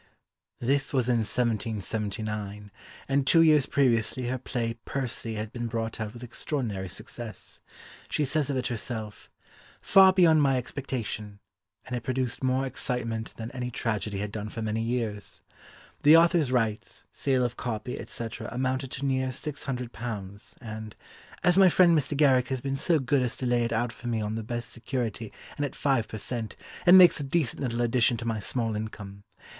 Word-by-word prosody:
This 135 Hz, +3 st, 0 dB
was 125 Hz, -3 st, +2 dB
in 125 Hz, -2 st, +3 dB
1779, 105 Hz, -2 st, -2 dB, 0.4 s
and 140 Hz, 0 st, +1 dB
two 165 Hz, +2 st, +7 dB
years 155 Hz, -4 st, +5 dB
previously 125 Hz, -2 st, +1 dB
her 130 Hz, 0 st, -2 dB
play 120 Hz, -2 st, -2 dB
Percy 120 Hz, -4 st, -3 dB
had 105 Hz, 0 st, -4 dB
been 120 Hz, -1 st, -4 dB
brought 115 Hz, -1 st, -3 dB
out 105 Hz, 0 st, -4 dB
with 120 Hz, -, -9 dB
extraordinary 115 Hz, -, -3 dB
success; 110 Hz, +2 st, -9 dB, 0.5 s
she 150 Hz, -, +1 dB
says 145 Hz, +1 st, 0 dB
of 140 Hz, -, 0 dB
it 125 Hz, -, -2 dB
herself, 110 Hz, -2 st, -5 dB, 0.5 s
"far 190 Hz, -1 st, +7 dB
beyond 170 Hz, -5 st, +5 dB
my 135 Hz, -2 st, +3 dB
expectation," 115 Hz, -5 st, -4 dB, 0.5 s
and 125 Hz, -, -4 dB
it 120 Hz, -, -3 dB
produced 130 Hz, +1 st, -2 dB
more 130 Hz, +1 st, +1 dB
excitement 115 Hz, -3 st, -3 dB
than 115 Hz, +1 st, -6 dB
any 125 Hz, -1 st, -4 dB
tragedy 110 Hz, -4 st, -2 dB
had 105 Hz, +1 st, -3 dB
done 105 Hz, 0 st, -5 dB
for 115 Hz, +1 st, -5 dB
many 110 Hz, +1 st, -1 dB
years. 115 Hz, -3 st, -3 dB, 0.6 s
The 155 Hz, +3 st, +8 dB
author's 165 Hz, -5 st, +4 dB
rights, 115 Hz, -4 st, -1 dB
sale 130 Hz, -3 st, +1 dB
of 120 Hz, 0 st, -3 dB
copy, 120 Hz, +1 st, -4 dB
etc., 115 Hz, 0 st, -6 dB
amounted 130 Hz, +2 st, -1 dB
to 140 Hz, -, -3 dB
near 130 Hz, -1 st, 0 dB
six 140 Hz, +2 st, -6 dB
hundred 125 Hz, -3 st, -4 dB
pounds, 100 Hz, -4 st, -6 dB
and 110 Hz, -2 st, -7 dB, 0.5 s
"as 180 Hz, +2 st, +5 dB
my 190 Hz, -1 st, +8 dB
friend 175 Hz, -1 st, +5 dB
Mr. 145 Hz, -1 st, +1 dB
Garrick 130 Hz, -4 st, +4 dB
has 130 Hz, -2 st, -2 dB
been 135 Hz, +1 st, -2 dB
so 160 Hz, +4 st, +2 dB
good 135 Hz, 0 st, +1 dB
as 125 Hz, -2 st, -1 dB
to 130 Hz, -, -5 dB
lay 120 Hz, -1 st, +2 dB
it 115 Hz, -, -3 dB
out 120 Hz, +1 st, 0 dB
for 120 Hz, -, -9 dB
me 115 Hz, -2 st, 0 dB
on 105 Hz, 0 st, -2 dB
the 115 Hz, -, -3 dB
best 120 Hz, +2 st, -5 dB
security 115 Hz, -3 st, -4 dB, 0.3 s
and 145 Hz, -, -1 dB
at 145 Hz, -, -3 dB
five 135 Hz, -6 st, +1 dB
per 110 Hz, -, -6 dB
cent., 115 Hz, 0 st, -4 dB, 0.3 s
it 175 Hz, -, +9 dB
makes 180 Hz, -3 st, +8 dB
a -, -, -2 dB
decent 140 Hz, -2 st, 0 dB
little 120 Hz, -3 st, -1 dB
addition 120 Hz, 0 st, +3 dB
to 115 Hz, -, -6 dB
my 115 Hz, -2 st, -1 dB
small 115 Hz, +1 st, -1 dB
income. 100 Hz, -2 st, -6 dB
120 Hz, 180 wpm, -27 LUFS, 110-135 Hz, 0.6 s, it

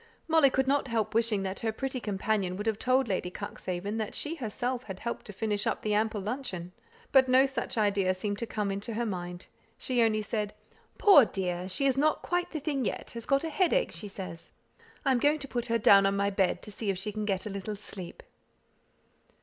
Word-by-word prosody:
Molly 320 Hz, -4 st, +5 dB
could 265 Hz, 0 st, +1 dB
not 280 Hz, 0 st, +2 dB
help 230 Hz, -3 st, -1 dB
wishing 225 Hz, -3 st, +2 dB
that 190 Hz, 0 st, -3 dB
her 225 Hz, -, 0 dB
pretty 265 Hz, +3 st, -3 dB
companion 200 Hz, -3 st, -1 dB
would 210 Hz, -, -4 dB
have 220 Hz, -2 st, 0 dB
told 255 Hz, 0 st, +2 dB
Lady 185 Hz, -3 st, -1 dB
Cuxhaven 185 Hz, +3 st, -5 dB
that 220 Hz, -2 st, -3 dB
she 305 Hz, -, -1 dB
herself 250 Hz, -2 st, -3 dB
had 190 Hz, -2 st, -7 dB
helped 235 Hz, -, -4 dB
to -, -, -6 dB
finish 205 Hz, 0 st, -1 dB
up -, -, -1 dB
the 215 Hz, -, 0 dB
ample 215 Hz, 0 st, +1 dB
luncheon; 200 Hz, -6 st, -4 dB, 0.4 s
but 265 Hz, -1 st, +5 dB
no 260 Hz, +1 st, +6 dB
such 265 Hz, -3 st, -3 dB
idea 200 Hz, -3 st, +2 dB
seemed 205 Hz, +2 st, -3 dB
to 235 Hz, -, -3 dB
come 210 Hz, -2 st, -2 dB
into 200 Hz, +3 st, -4 dB
her 240 Hz, +1 st, 0 dB
mind. 180 Hz, -3 st, -5 dB, 0.3 s
She 250 Hz, -2 st, 0 dB
only 215 Hz, -2 st, +2 dB
said, 210 Hz, -1 st, -3 dB, 0.4 s
"Poor 395 Hz, -, +8 dB
dear! 180 Hz, -3 st, -3 dB
she 275 Hz, +9 st, 0 dB
is 270 Hz, -1 st, +2 dB
not 305 Hz, +2 st, +2 dB
quite 355 Hz, 0 st, 0 dB
the 310 Hz, -, -4 dB
thing 285 Hz, -2 st, -1 dB
yet; -, -, -3 dB
has 230 Hz, -1 st, -7 dB
got 275 Hz, +1 st, +3 dB
a 325 Hz, -, -3 dB
headache, 390 Hz, +10 st, +2 dB
she 210 Hz, -, -6 dB
says. 190 Hz, -4 st, -8 dB, 0.5 s
I 270 Hz, -, +4 dB
am 255 Hz, -, +3 dB
going 295 Hz, +4 st, +3 dB
to 280 Hz, -2 st, -6 dB
put 240 Hz, -2 st, -2 dB
her 230 Hz, 0 st, +2 dB
down 200 Hz, -3 st, +6 dB
on 195 Hz, -, +1 dB
my 200 Hz, 0 st, +1 dB
bed, 195 Hz, -2 st, +1 dB
to 210 Hz, -, -8 dB
see 205 Hz, +1 st, -4 dB
if 195 Hz, -, 0 dB
she 205 Hz, +3 st, -2 dB
can 215 Hz, 0 st, -3 dB
get 190 Hz, -2 st, -1 dB
a 210 Hz, -, -4 dB
little 200 Hz, +2 st, -4 dB
sleep." 200 Hz, -, -9 dB
215 Hz, 220 wpm, -29 LUFS, 195-260 Hz, 0.5 s, Poor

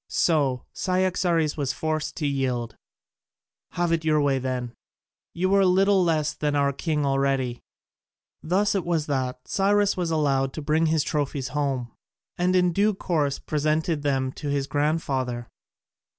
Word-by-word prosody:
So 140 Hz, -7 st, +1 dB
Cyaxares 180 Hz, -4 st, +1 dB
was 140 Hz, -3 st, -1 dB
forced 155 Hz, -1 st, -2 dB
to 155 Hz, -, -3 dB
yield: 125 Hz, -5 st, -1 dB, 1.0 s
"Have 175 Hz, -1 st, 0 dB
it 165 Hz, -1 st, +1 dB
your 155 Hz, -1 st, +2 dB
own 150 Hz, -, +2 dB
way 135 Hz, -2 st, +2 dB
then, 125 Hz, -2 st, -3 dB, 0.6 s
you 185 Hz, +3 st, 0 dB
are 200 Hz, 0 st, +5 dB
little 190 Hz, +1 st, +4 dB
less 155 Hz, -3 st, +1 dB
than 150 Hz, -1 st, -1 dB
our 140 Hz, -1 st, +2 dB
king 150 Hz, 0 st, -1 dB
already." 135 Hz, -3 st, 0 dB, 0.8 s
Thus 195 Hz, +5 st, +1 dB
it 195 Hz, -3 st, 0 dB
was 165 Hz, -3 st, 0 dB
that 130 Hz, -3 st, -3 dB
Cyrus 205 Hz, +1 st, +2 dB
was 180 Hz, -3 st, -2 dB
allowed 135 Hz, -4 st, +1 dB
to 155 Hz, -, -5 dB
bring 155 Hz, +2 st, +2 dB
his 155 Hz, -2 st, +2 dB
trophies 140 Hz, -3 st, -2 dB
home, 135 Hz, -5 st, -2 dB, 0.4 s
and 180 Hz, +1 st, +1 dB
in 180 Hz, -1 st, +3 dB
due 205 Hz, +3 st, +2 dB
course 150 Hz, -7 st, 0 dB
presented 155 Hz, +1 st, -1 dB
them 135 Hz, -2 st, 0 dB
to 145 Hz, -, -6 dB
his 140 Hz, -1 st, 0 dB
grandfather. 135 Hz, -5 st, -1 dB
150 Hz, 150 wpm, -25 LUFS, 135-170 Hz, 1.0 s, are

